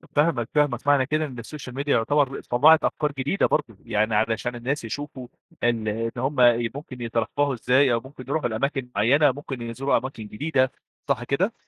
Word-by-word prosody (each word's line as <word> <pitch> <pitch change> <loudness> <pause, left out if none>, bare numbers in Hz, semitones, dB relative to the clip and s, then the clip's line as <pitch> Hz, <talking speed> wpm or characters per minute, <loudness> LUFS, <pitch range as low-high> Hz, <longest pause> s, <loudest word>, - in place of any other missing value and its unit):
فاهمك، 145 -6 +2
فاهمك. 150 -1 +1
معنى 140 -2 +4
كده 155 +3 0
إن 125 -5 -7
الsocial 125 0 -9
media 140 +3 -4
يعتبر 140 +2 +2
طلّعت 155 +6 +5
أفكار 150 -1 0
جديدة 140 +9 +1
برضه، 110 -4 -1
يعني 110 +1 +1
علشان 115 +3 0
الناس 130 +4 -3
يشوفوا 130 +1 -6 0.4
إن 115 -2 +1
إن 115 +2 -1
هُم 130 +2 0
ي 120 -2 +4
ممكن 135 -4 -8
يترفّهوا 120 +5 0
إزاي 130 +2 +3
أو 115 - +2
ممكن 130 +1 -12
يروحوا 140 -3 0
لأماكن 130 +3 -2
معيّنة، 135 +8 +4
ممكن 135 -2 -7
يزوروا 120 +4 0
أماكن 130 -4 -5
جديدة. 130 +2 0 0.4
صح 120 - 0
كده؟ 185 - 0
130 Hz, 175 wpm, -24 LUFS, 115-145 Hz, 0.4 s, طلّعت